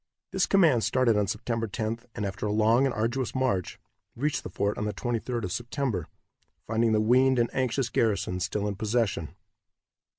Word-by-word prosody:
This -, -, +1 dB
command 160 Hz, -, +4 dB
started 125 Hz, -3 st, +3 dB
on 105 Hz, -1 st, +1 dB
September 115 Hz, +2 st, -2 dB
10th, 110 Hz, +2 st, -4 dB
and 105 Hz, -, -2 dB
after 100 Hz, +2 st, -3 dB
a -, -, -1 dB
long 110 Hz, +5 st, +4 dB
and 130 Hz, -, -2 dB
arduous 120 Hz, +2 st, -1 dB
march, 125 Hz, -9 st, 0 dB, 0.4 s
reached 145 Hz, +5 st, -1 dB
the -, -, -7 dB
fort 100 Hz, 0 st, -1 dB
on 105 Hz, -, -1 dB
the 105 Hz, -, -3 dB
23d 120 Hz, -1 st, -2 dB
of 90 Hz, -, -3 dB
September, 120 Hz, -, -2 dB, 0.6 s
finding 115 Hz, +1 st, +1 dB
the 110 Hz, -, +3 dB
weaned 130 Hz, +4 st, +4 dB
and 120 Hz, -1 st, +1 dB
anxious 130 Hz, -1 st, 0 dB
garrison 100 Hz, -6 st, 0 dB
still 105 Hz, +3 st, -1 dB
in 105 Hz, -, -1 dB
possession. 105 Hz, -5 st, -1 dB
115 Hz, 175 wpm, -27 LUFS, 105-125 Hz, 0.6 s, command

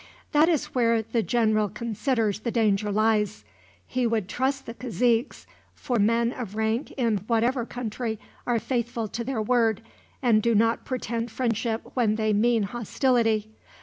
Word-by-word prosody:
"That 305 Hz, +3 st, +5 dB
is 320 Hz, -5 st, 0 dB
where 230 Hz, -3 st, +2 dB
the 225 Hz, +1 st, -1 dB
general 220 Hz, -3 st, +1 dB
considers 230 Hz, -1 st, -1 dB
the 235 Hz, -, -3 dB
danger 210 Hz, -3 st, +1 dB
lies. 215 Hz, -1 st, +1 dB, 0.4 s
He 255 Hz, -1 st, 0 dB
would 220 Hz, -5 st, 0 dB
trust 270 Hz, +5 st, -1 dB
the 230 Hz, -, -6 dB
caziques, 240 Hz, 0 st, 0 dB, 0.3 s
for 245 Hz, -3 st, -1 dB
men 230 Hz, +3 st, +2 dB
of 220 Hz, -5 st, -6 dB
rank 220 Hz, +4 st, 0 dB
in 230 Hz, -5 st, +1 dB
whatever 235 Hz, +1 st, +1 dB
country 230 Hz, -1 st, -4 dB, 0.3 s
are 240 Hz, -1 st, +2 dB
faithful 235 Hz, -1 st, -2 dB
to 235 Hz, -, -4 dB
their 235 Hz, -3 st, -2 dB
word, 225 Hz, -2 st, +2 dB, 0.4 s
and 230 Hz, -4 st, +3 dB
do 235 Hz, +1 st, +2 dB
not 225 Hz, +2 st, +2 dB
pretend 235 Hz, -2 st, -3 dB
friendship 230 Hz, -1 st, -1 dB
when 225 Hz, -4 st, +2 dB
they 215 Hz, -1 st, +1 dB
mean 225 Hz, +1 st, +3 dB
hostility. 225 Hz, 0 st, 0 dB
230 Hz, 150 wpm, -26 LUFS, 220-245 Hz, 0.4 s, That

